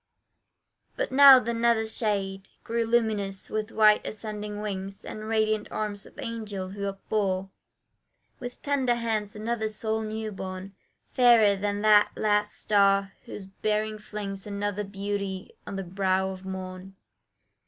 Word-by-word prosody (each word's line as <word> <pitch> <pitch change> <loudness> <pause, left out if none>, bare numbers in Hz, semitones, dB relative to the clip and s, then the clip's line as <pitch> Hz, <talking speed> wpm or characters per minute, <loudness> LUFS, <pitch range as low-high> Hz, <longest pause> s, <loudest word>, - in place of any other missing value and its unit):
But - - -1
now 275 0 +10
the 235 -1 -1
nether 230 -1 +2
shade 195 -3 -2
Grew 230 0 -1
luminous 215 -4 0
with 215 0 -2
white 215 -1 +5
ascending 210 -1 -6
wings, 195 -2 -5
And 215 0 -7
radiant 215 -1 +1
arms 205 -2 -3
of - - -19
angels, 205 -5 -5
who 200 0 -3
upbore 195 -1 -2 0.9
With 245 0 -8
tender 270 -4 +1
hands 220 -3 -2
another 220 +1 -2
soul 220 +1 -1
new 220 0 -4
born, 190 0 -7 0.4
Fairer 235 -5 +6
than 205 +1 -2
that 210 -1 +5
last 210 -1 +1
star 195 -1 +2
whose 200 - -8
bearing 215 +2 -2
flings 205 -2 -6
Another 205 0 -2
beauty 200 -1 -4
on - - -5
the 195 - -3
brow 190 +1 0
of 190 0 -9
morn. 190 0 -7
210 Hz, 135 wpm, -27 LUFS, 195-220 Hz, 0.9 s, now